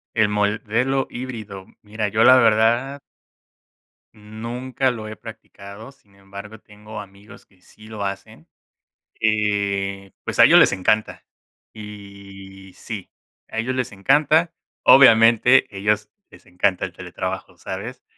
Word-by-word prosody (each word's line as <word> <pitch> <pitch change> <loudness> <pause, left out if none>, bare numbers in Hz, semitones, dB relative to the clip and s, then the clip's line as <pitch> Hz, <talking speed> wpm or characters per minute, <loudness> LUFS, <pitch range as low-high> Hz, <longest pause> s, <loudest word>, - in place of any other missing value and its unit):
El 110 -2 +2
modelo 110 +6 -1
híbrido. 110 -6 -8 0.2
Mira, 105 0 -4
yo, 110 +3 +1
la 130 0 +7
verdad 115 +4 +2 1.2
nunca 120 +5 -4
lo 110 -3 -7
he 110 - -9
practicado, 100 +5 -12
sin 100 -7 -29
embargo, 100 +2 -11
tengo 105 +1 -11
amigos 100 +1 -16
que 95 -2 -30
sí 110 +3 -18
lo 105 -2 -6
hacen, 100 0 -8 0.7
eh, 100 -3 -1
pues - - -5
a - - +7
ellos - - +7
les - - +5
encanta. 110 +3 -1 0.5
Y, 100 -2 -12
sí, 105 -5 -8 0.4
a - - -8
ellos 120 +3 -2
les 125 -1 -3
encanta. 150 - +2 0.3
Obviamente, 115 0 +6
ellos 105 +2 -1 0.2
les - - -19
encanta 90 +1 -1
el 90 - -10
teletrabajo, 95 0 -7
¿sabes? 105 +8 -8
105 Hz, 125 wpm, -21 LUFS, 100-115 Hz, 1.2 s, la